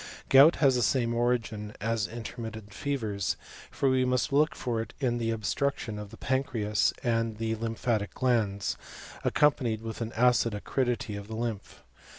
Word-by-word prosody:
Gout 140 +5 +8
has 135 -3 +4
the 125 - +1
same 120 0 +2
origin 115 -3 -1
as 115 0 0
intermittent 110 -2 -7
fevers, 110 -9 -2 0.3
for 140 - 0
we 130 -1 +3
must 125 +1 0
look 150 +2 +3
for 115 -3 -2
it 115 - -8
in 120 -4 0
the 115 -1 -1
obstruction 115 0 -1
of 105 -1 -7
the - - -12
pancreas 125 -6 +1
and 115 -3 0
the 110 0 -1
lymphatic 115 -1 -2
glands, 110 -6 0 0.5
accompanied 125 -7 +2
with 115 +1 -6
an 115 0 -3
acid 120 -2 +3
acridity 120 -1 -1
of 100 0 -7
the 110 - -6
lymph. 115 -3 -5
115 Hz, 160 wpm, -29 LUFS, 110-125 Hz, 0.5 s, Gout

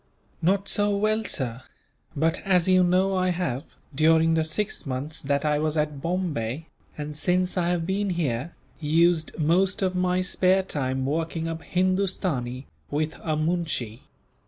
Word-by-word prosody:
"Not 195 +4 +2
so 205 -1 +2
well, 215 +1 +1
sir; 125 - -2 0.5
but 160 +2 +1
as 185 -3 +3
you 185 -1 +5
know 185 +2 +2
I 185 0 +2
have, 170 -7 -1 0.3
during 160 +3 +4
the 160 0 +2
six 160 +3 -3
months 140 +4 -3
that 140 +1 0
I 150 -1 +2
was 155 0 0
at 150 -2 -1
Bombay, 165 -6 -2 0.3
and 150 0 -5
since 180 +4 +1
I 175 -2 +1
have 175 -2 0
been 195 +2 0
here, 160 -4 -2 0.2
used 160 +1 +2
most 185 +5 +2
of 185 -1 +1
my 180 0 +1
spare 185 +1 +2
time 130 -6 -2
working 165 +3 -2
up 165 0 -4
Hindustani, 180 -10 -1 0.2
with 155 +2 -1
a 155 -2 -1
moonshee." 155 -8 -2
165 Hz, 155 wpm, -25 LUFS, 150-185 Hz, 0.5 s, you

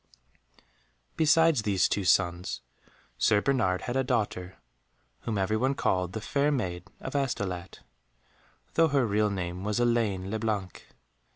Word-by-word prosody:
Besides 160 -3 +4
these 100 -4 +2
two 100 - -1
sons, 85 0 +1 0.6
Sir 105 - +4
Bernard 110 -7 +1
had 125 - -4
a 135 - +2
daughter 105 -7 -2 0.6
whom 110 -3 -3
every 100 +3 +1
one 130 +4 +1
called 90 -5 0
The 110 - -4
Fair 140 +6 +1
Maid 90 - -2
of 130 - -6
Astolat, 95 -10 -3 0.9
though 165 0 +4
her 140 -4 +2
real 105 0 +2
name 90 -2 -4
was 105 +2 -1
Elaine 110 -6 +1
le 110 - -2
Blanc. 105 -5 -3
105 Hz, 135 wpm, -28 LUFS, 95-130 Hz, 0.9 s, Besides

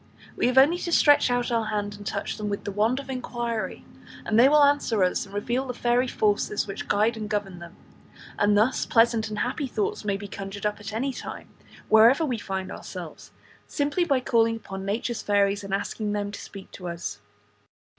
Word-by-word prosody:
We - - +1
have 255 +1 0
only 300 +7 +6
to 345 - -4
stretch 290 -5 +5
out 245 0 0
our 230 -1 +1
hand 205 -1 -2
and 205 0 -10
touch - - -3
them 210 -1 -3
with 200 - -3
the 205 - -4
wand 220 +6 +1
of 275 - -8
inquiry, 240 -3 -4 0.4
and 220 +1 +2
they 260 +3 +7
will 300 0 +6
answer 280 -8 +3
us 180 +2 0
and 195 - -12
reveal 240 +6 -1
the 250 - -4
fairy 245 +1 +1
forces 210 -3 0
which 195 -1 -6
guide 215 +3 +2
and 215 -1 -5
govern 200 -4 -3
them; 170 0 -11 0.6
and 205 0 +4
thus 225 +5 +2
pleasant 230 -1 +3
and 210 - -5
happy 260 +5 -2
thoughts 420 - -2
may 200 -2 -1
be 205 0 -8
conjured 195 +1 -7
up 210 0 -1
at 205 0 -7
any 260 +5 -2
time, - - -8 0.4
wherever 230 +8 +6
we 245 -6 -2
find 190 -2 -4
ourselves, - - -9
by - - -32 0.3
simply 290 +4 0 0.2
calling 230 -2 +2
upon 195 -3 -7
nature's 220 +3 -2
fairies 200 0 +1
and 195 - -7
asking 205 +1 -2
them 205 -1 -2
to 205 - -8
speak 195 -1 -11
to 180 - -8
us. 165 -13 -5
220 Hz, 205 wpm, -25 LUFS, 205-245 Hz, 0.6 s, they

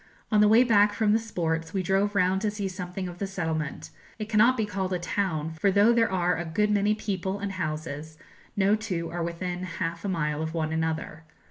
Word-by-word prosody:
On 210 -1 +5
the 210 - +6
way 225 +4 +6
back 210 -4 +4
from 210 0 +2
the 220 - +4
sports 165 -6 -3
we 190 - 0
drove 195 +3 +1
round 190 0 +2
to 215 - +1
see 205 -1 -3
something 185 0 -5
of 175 0 -9
the 200 - -2
settlement; 160 -6 -3 0.3
it 215 -1 -5
cannot 230 +4 +4
be 220 - +1
called 190 -2 -3
a - - +1
town, 170 -3 -2
for 200 - +3
though 205 +4 +5
there 230 -2 +2
are 180 -1 +1
a 170 - -2
good 210 +6 0
many 210 +1 +2
people 195 -2 -3
and 200 0 -4
houses, 155 -3 -5 0.4
no 200 +1 +4
two 180 -7 -3
are 175 0 -3
within 175 +1 -3
half 170 -2 -4
a 200 - -2
mile 150 -4 -1
of 160 +1 -4
one 160 -1 -1
another. 160 -1 -2
185 Hz, 220 wpm, -27 LUFS, 165-205 Hz, 0.4 s, the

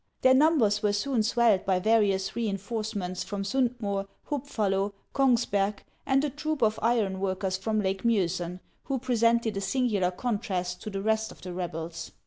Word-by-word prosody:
Their 260 - +6
numbers 260 -8 +4
were 210 -2 +2
soon 235 +3 +1
swelled 225 -3 +3
by 190 -1 +2
various 195 -1 +2
reinforcements 205 -3 -3
from 195 +1 -4
Stmd 250 +3 0
Moer, 200 -2 -2 0.2
Hub 285 -1 -3
fallo, 200 -5 0 0.2
Kongsberg, 220 -7 +2 0.2
and 270 0 +3
a 300 - +1
troop 300 -2 -2
of 215 -1 +2
iron 215 -5 +1
workers 190 0 -1
from 215 +3 -1
Lake 190 -1 -1
Miosen, 180 -5 0 0.2
who 275 - -1
presented 235 -3 +2
a - - -1
singular 205 -3 +1
contrast 180 -4 -3
to - - -5
the 195 -1 -4
rest 220 0 +1
of - - -15
the 180 -1 -6
rebels. 165 -2 -5
210 Hz, 165 wpm, -28 LUFS, 190-235 Hz, 0.2 s, Their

